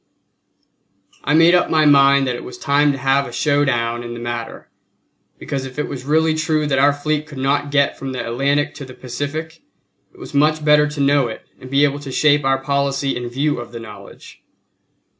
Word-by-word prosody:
I 150 - +1
made 165 +2 +6
up 180 - +3
my 155 -1 +3
mind 140 -1 +5
that 125 - -1
it 120 - -7
was 125 - -9
time 145 +3 +2
to 140 - -4
have 135 +1 +1
a - - -9
show 145 +3 +1
down 120 -3 -1
in 120 0 -7
the - - -7
matter; 120 -1 -6 0.7
because 135 -1 -4
if 130 0 -9
it 150 - -2
was 130 -2 -7
really 160 +2 +2
true 155 -1 0
that 135 -2 0
our 140 +1 +5
fleet 150 +1 -2
could 145 -3 -11
not 140 +2 0
get 140 0 +1
from 135 -1 -5
the 130 - -4
Atlantic 140 +5 0
to 140 - -8
the 130 -1 -12
Pacific, 145 +6 -6 0.5
it - - -22
was - - -11
much 150 +2 +2
better 150 0 +5
to 150 0 -7
know 140 -2 +3
it 110 - -8 0.2
and 130 - -11
be 140 +2 +2
able 145 0 +1
to 140 -2 -8
shape 145 +1 +3
our 135 0 +2
policy 140 0 -1
in 120 0 -5
view 140 +3 -1
of 120 - -9
the 115 - -6
knowledge. 110 -2 -13
140 Hz, 215 wpm, -19 LUFS, 130-150 Hz, 0.7 s, made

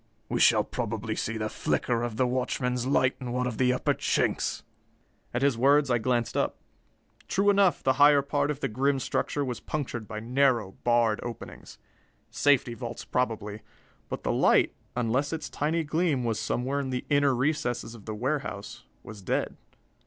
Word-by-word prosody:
We - - -1
shall - - +5
probably 110 -2 -3
see 115 0 -2
the 110 -1 -2
flicker 115 +2 -1
of 120 -2 -3
the 130 - +3
watchman's 125 0 -1
light 130 -2 +2
in 125 -1 -4
one 125 0 0
of 120 -3 -4
the 125 -1 +4
upper 125 - +1
chinks." - - 0 0.7
At 120 +2 -1
his 140 -5 +2
words, 140 +1 +4
I 120 - +3
glanced 120 0 0
up. - - 0 0.7
True 200 +2 +3
enough, 195 -3 +3
the 130 - +3
higher 145 -1 +7
part 145 0 0
of 145 -1 -3
the - - +1
grim 135 +5 +1
structure 140 +2 -1
was 125 -3 -4
punctured 125 -7 -4
by 110 -1 -5
narrow, 120 -3 +1
barred 120 -2 +3
openings. 120 -2 -8 0.5
Safety 135 -4 +2
vaults, 120 0 -7
probably. 110 -4 -2 0.5
But - - -5
the - - 0
light, - - +4 0.2
unless 125 +4 0
its 160 -1 -5
tiny 160 +3 0
gleam 155 -3 0
was 115 -2 -1
somewhere 125 +5 -1
in 135 -2 -3
the 125 -1 -3
inner 145 -2 +4
recesses 120 -3 -1
of 110 -4 -13
the 110 - -4
warehouse, 125 - -4 0.2
was 105 -2 -10
dead. 95 - -1
125 Hz, 175 wpm, -27 LUFS, 115-140 Hz, 0.7 s, higher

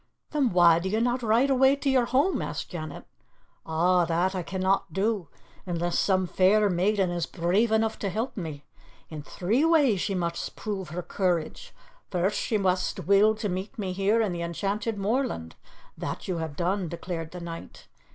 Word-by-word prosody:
"Then 285 -5 +2
why 175 -3 +5
do 190 +2 -3
you 215 +3 0
not 245 +2 +1
ride 235 +4 +3
away 265 +1 +5
to 280 0 -5
your 260 -3 +3
home?" 275 +11 +1
asked - - -4
Janet. 155 -4 -6 0.6
"Ah, 175 +3 +3
that 175 +3 +1
I 185 - -2
can 190 +2 -5
not 190 -1 +1
do 195 0 -1 0.4
unless 175 0 -1
some 190 -2 +2
fair 195 +3 +3
maiden 190 +1 +1
is 175 -2 -2
brave 190 +6 +1
enough 220 0 +1
to 200 - -2
help 225 +7 -3
me. 155 -7 -6 0.5
In 155 -1 -6
three 205 - 0
ways 290 - +4
she 200 -1 -1
must 170 -2 -3
prove 195 -5 -4
her 175 +3 -5
courage. 175 -5 -2 0.4
First 185 +2 0
she 220 - 0
must 185 -2 0
will 200 +3 +5
to 215 0 -3
meet 190 +7 -4
me 195 -4 -3
here 200 +5 +2
in 210 -4 0
the 170 -1 -4
enchanted 200 +6 -2
moorland. 200 - -1 0.4
That - - -5
you 185 -3 -1
have 160 -3 -4
done," 180 +3 -1
declared 165 -1 -5
the 180 - -8
knight. 170 -1 -9
190 Hz, 180 wpm, -27 LUFS, 175-220 Hz, 0.6 s, why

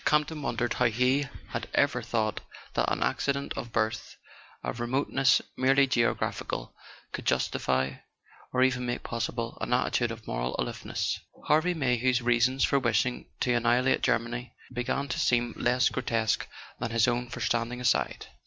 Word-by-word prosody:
Campton 150 0 +1
wondered 120 -3 -1
how 125 - +1
he 125 +5 +2 0.2
had - - -4
ever - - +3
thought 110 -2 -1 0.3
that - - +1
an - - +1
accident 140 0 -1
of 120 - -5
birth, 110 -1 -1 0.5
a - - -2
remoteness 130 +2 +2
merely 135 +2 +4
geographical, 120 -3 -1 0.4
could - - -5
justify, 65 +1 +1 0.6
or 130 0 +3
even 130 -1 +2
make 120 0 -3
possible, 115 0 -3
an - - -3
attitude 120 -1 +2
of 115 -1 -7
moral - - -2
aloofness. - - -2 0.3
Harvey 160 +4 +3
Mayhew's 125 -3 +2
reasons 120 +2 +2
for 140 - +3
wishing 125 0 0
to 125 - +2
annihilate 120 +2 +3
Germany 120 0 -1 0.2
began 125 +3 -1
to 130 - -3
seem 120 -1 +2
less 125 +1 +2
grotesque 115 -4 0 0.3
than 115 - -2
his 115 0 +3
own 120 0 0
for - - -6
standing 120 +1 0
aside. 125 - +1
120 Hz, 150 wpm, -28 LUFS, 115-130 Hz, 0.6 s, merely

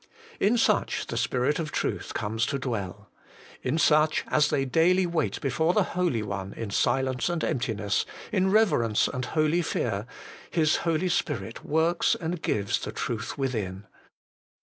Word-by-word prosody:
In 225 +4 +3
such 230 - +1
the - - -5
Spirit 130 +5 0
of 155 -2 -3
truth - - -3
comes 110 +3 -1
to 140 - -1
dwell. 115 -9 -5 0.5
In 155 - -1
such, 155 -1 +3
as 150 -1 +3
they 135 - +1
daily 175 +7 +3
wait 170 -2 -1
before 160 +6 +1
the 210 - +4
Holy 175 - 0
One 100 -1 -5
in 110 -3 -5
silence 130 - +1
and 175 -2 -2
emptiness, 110 -5 -1 0.2
in 190 -3 +2
reverence 150 - +3
and 125 - -4
holy 155 +3 +1
fear, 115 - -2 0.4
His 155 -2 +2
Holy 170 +2 0
Spirit 115 - -2
works 160 +3 +2
and 165 0 -4
gives 100 -1 0
the - - -5
truth 115 +2 -4
within. 105 -8 -3
140 Hz, 150 wpm, -27 LUFS, 115-165 Hz, 0.5 s, the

